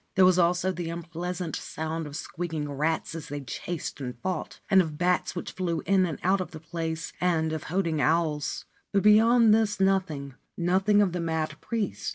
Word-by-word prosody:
There 185 - +6
was 185 0 +5
also 175 +2 +2
the 175 -2 -4
unpleasant 170 +1 -4
sound 160 0 -4
of 145 - -8
squeaking 160 -2 -4
rats 155 +4 -1
as 165 -3 -6
they 145 0 -5
chased 145 +4 -5
and 125 -2 -5
fought, 185 +4 -4
and 190 -1 +6
of 155 -4 -4
bats 180 +2 +1
which 175 - -4
flew 170 -3 -2
in 190 -2 +3
and 160 - -4
out 190 +1 +3
of 185 - -4
the 155 - -9
place, 160 -1 -4
and 160 -3 +1
of 160 - -4
hooting 165 -4 0
owls; 155 -2 0 0.3
but 200 -1 +2
beyond 225 +2 +6
this 215 -2 +2
nothing 185 -8 +1 0.2
— - - -51
nothing 190 +4 +3
of 190 - 0
the 175 0 -2
mad 160 -2 -1
priest. 155 - -2
170 Hz, 195 wpm, -27 LUFS, 160-185 Hz, 0.3 s, There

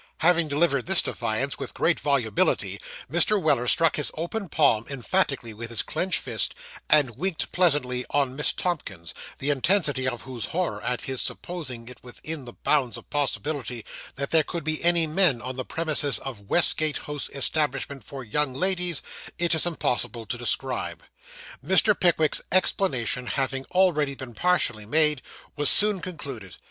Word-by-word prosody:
Having 170 -1 +4
delivered 140 -2 +1
this 190 - +4
defiance - - -2
with - - -7
great - - +2
volubility, - - 0 0.3
Mr. 215 -2 +3
Weller 140 -8 +1
struck 165 +5 +4
his 150 - 0
open 180 +4 -4
palm 140 -9 +3
emphatically 135 -3 -1
with 115 +2 -7
his 115 -2 0
clenched 185 -1 -1
fist, - - -2 0.3
and 145 -7 +4
winked 185 -2 -2
pleasantly 145 -8 +1
on 135 -3 0
Miss 150 - +4
Tomkins, 150 - -4 0.2
the 145 +2 0
intensity 145 -2 +1
of 120 -2 -3
whose 125 -3 -4
horror 180 +1 -2
at 125 -1 -1
his 130 -2 +1
supposing 130 -10 -3
it 125 - -11
within 140 +3 -6
the 120 - -9
bounds 130 -7 +1
of 115 - -14
possibility 140 -4 -2 0.3
that 140 0 -4
there 160 - +5
could 170 +2 -5
be 155 +1 -1
any 170 -1 +5
men 155 -5 +3
on 125 +2 -6
the 130 - -3
premises 155 -3 0
of 105 -7 -8
Westgate 155 -3 +3
House 150 -1 -4
Establishment 140 -2 0
for 135 +4 -8
Young 130 +3 -1
Ladies, 180 -1 0 0.3
it 170 -1 +1
is 160 +2 +3
impossible 125 -7 -2
to 105 - -3
describe. 120 -8 -2 0.6
Mr. 190 +7 +4
Pickwick's 160 -3 +3
explanation 130 - +1
having 135 -1 -1
already 165 -6 +2
been 130 -3 -9
partially 120 -11 +1
made, 150 +1 +3 0.3
was 145 -1 +2
soon 210 -2 +5
concluded. 140 - -7
145 Hz, 155 wpm, -25 LUFS, 125-170 Hz, 0.6 s, there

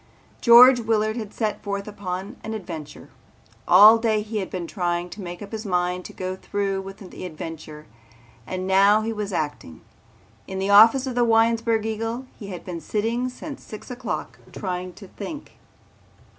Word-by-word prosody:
George 245 +2 +8
Willard 220 -1 0
had 215 -4 -5
set 215 -3 -2
forth 200 0 -4
upon 200 +1 -5
an 220 +1 -4
adventure. 165 -7 -8 0.6
All 210 +5 +8
day 220 -2 +1
he 215 +1 -5
had 190 - -4
been 180 -2 -4
trying 175 -1 -2
to 210 - -8
make 175 +1 -7
up 200 - -11
his 220 -1 -5
mind 180 -2 -1
to - - -8
go 185 0 -5
through 195 0 -2
with 195 0 -9
the - - -9
adventure 155 -2 -8 0.6
and 185 0 -4
now 200 +3 +4
he 225 +1 -2
was 210 -2 -4
acting. 145 - -4 0.7
In 190 - -5
the 195 +1 -1
office 225 +6 +7
of 260 - -3
the 245 0 +2
Winesburg 225 -1 +2
Eagle 225 +3 -3
he 205 - -8
had 180 -3 -8
been 175 -3 -6
sitting 230 +4 -1
since 275 +3 -9
six 215 +3 -10
o'clock 250 - -5
trying 180 -1 -4
to 195 - -13
think. 295 - -9
205 Hz, 170 wpm, -23 LUFS, 185-225 Hz, 0.7 s, George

